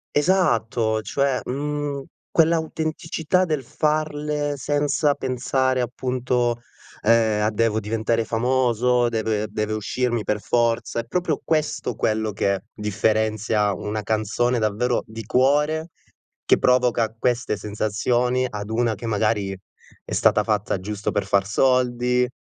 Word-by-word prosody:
Esatto, 115 - +2
cioè, 140 0 0
mhmm, 145 +1 -3 0.3
quell'autenticità 160 +1 +1
del 155 -5 -2
farle 150 +1 -1
senza 145 +1 +1
pensare 130 0 0
appunto, 125 -1 -1 0.4
ehm, 110 -1 +3
a 105 - +2
"Devo 110 0 +1
diventare 110 +1 -1
famoso, 125 +1 +2
deve 110 -2 -1
deve 105 0 -2
uscirmi 120 +2 -1
per 105 0 -1
forza", 115 0 0
è 115 - -4
proprio 165 +3 -1
questo 155 -1 -1
quello 110 0 0
che 100 -1 -1
differenzia 110 0 0
una 105 +4 -3
canzone 110 +4 0
davvero 115 +3 0
di 110 +1 -8
cuore, 150 +7 +2 0.5
che - - +4
provoca 120 -3 +2
queste 120 -1 0
sensazioni, 115 +5 0
ad 105 0 -6
una 115 0 +1
che, 105 - -9
magari, 105 -2 0 0.5
è - - -7
stata - - +3
fatta 105 -2 -1
giusto 105 +2 -3
per 100 - -1
far 100 -1 +2
soldi, 125 +2 +2
120 Hz, 120 wpm, -23 LUFS, 110-135 Hz, 0.5 s, che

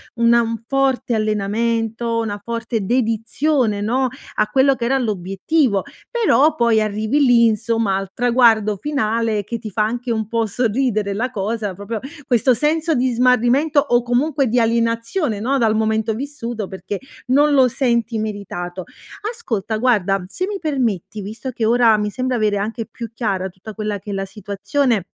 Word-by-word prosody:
una 235 0 +4
un 230 0 -3
forte 270 -3 +1
allenamento, 225 +2 -1
una 210 -2 -3
forte 230 -2 -3
dedizione, 230 +1 0
no, 255 +5 +1 0.3
a 210 - +2
quello 265 +5 +3
che 235 - -3
era 265 +2 +2
l'obiettivo. 195 -4 -4 0.7
Però, 350 - +3
poi 230 -3 +3
arrivi 215 +6 0
lì 240 -2 +5
insomma, 225 -2 +1
al 195 -1 -4
traguardo 230 -4 +3
finale, 225 -5 0
che 210 - -12
ti 215 - -7
fa 210 +1 0
anche 240 +3 -2
un 220 -2 -1
po' 230 0 0
sorridere 215 -2 0
la 245 +5 -2
cosa, 210 -1 -2
proprio 205 +4 -5 0.3
questo 250 +1 +3
senso 310 +6 +1
di 255 0 +1
smarrimento, 250 +5 +3
o 245 -4 +2
comunque 265 +3 +1
di 240 +2 +2
alienazione, 230 - 0
no, 260 +6 0
dal 225 -4 +2
momento 220 0 +1
vissuto, 240 -4 -5
perché 190 +2 -6 0.3
non 290 +3 +4
lo 265 -2 +6
senti 235 -2 0
meritato. 195 -4 -5 0.5
Ascolta 225 - -3
guarda, 205 -5 +2
se 365 - -3
mi 410 -1 -3
permetti 235 - -2
visto 220 +6 -6
che 230 - -4
ora, 230 -1 +5
mi 210 0 -1
sembra 255 +4 -2
avere 215 -3 +1
anche 220 +3 -3
più 230 -1 -7
chiara 200 -5 -1
tutta 185 +4 -11
quella 210 -1 -3
che 205 - -11
è - - -3
la 195 0 -2
situazione 205 +3 -1
230 Hz, 160 wpm, -20 LUFS, 210-250 Hz, 0.7 s, lo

